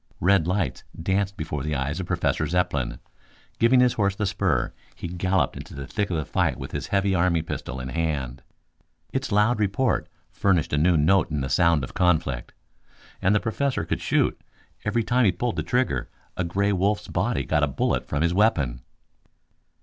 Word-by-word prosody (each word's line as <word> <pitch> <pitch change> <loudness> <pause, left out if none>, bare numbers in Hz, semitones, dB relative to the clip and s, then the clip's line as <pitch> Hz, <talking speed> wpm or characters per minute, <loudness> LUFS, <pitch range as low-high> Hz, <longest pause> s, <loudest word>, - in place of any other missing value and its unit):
Red 90 -2 +3
lights 95 -1 -1 0.2
danced 95 +3 0
before 75 -3 -3
the 75 +2 -2
eyes 70 +5 -2
of 90 - -4
Professor 90 -1 0
Zepplin. 75 -8 0 0.6
Giving 125 +2 +5
his 125 -1 +4
horse 100 -2 +1
the 105 - -1
spur, - - 0 0.2
he - - -6
galloped 90 +2 0
into - - -9
the 70 -1 -6
thick 105 - -2
of 85 - -1
the 75 - -2
fight - - 0
with - - -7
his - - -4
heavy 100 0 +1
army 85 -3 +2
pistol 65 -5 -5
in 65 0 -5
hand. 70 -5 -2 0.7
Its 135 -1 -2
loud 105 +3 +3
report 110 +5 +1 0.2
furnished 90 -7 +1
a - - +3
new 85 +2 +4
note 85 +5 +3
in 75 -2 -2
the 65 - -3
sound 85 0 +3
of 65 - -6
conflict. 80 -9 +1 0.7
And 95 +3 +3
the - - +4
Professor 130 +5 -1
could - - -2
shoot. - - +1 0.4
Every 115 +2 0
time 125 +3 +2
he 95 - +5
pulled 115 +7 -2
the - - +1
trigger 125 - 0 0.3
a 90 - -1
gray 100 +4 0
wolf's 100 +3 0
body 70 - 0
got 75 +3 +1
a 75 - +3
bullet 70 - -1
from 75 +1 -1
his 85 +1 +2
weapon. 75 - +2
90 Hz, 190 wpm, -25 LUFS, 75-100 Hz, 0.7 s, Giving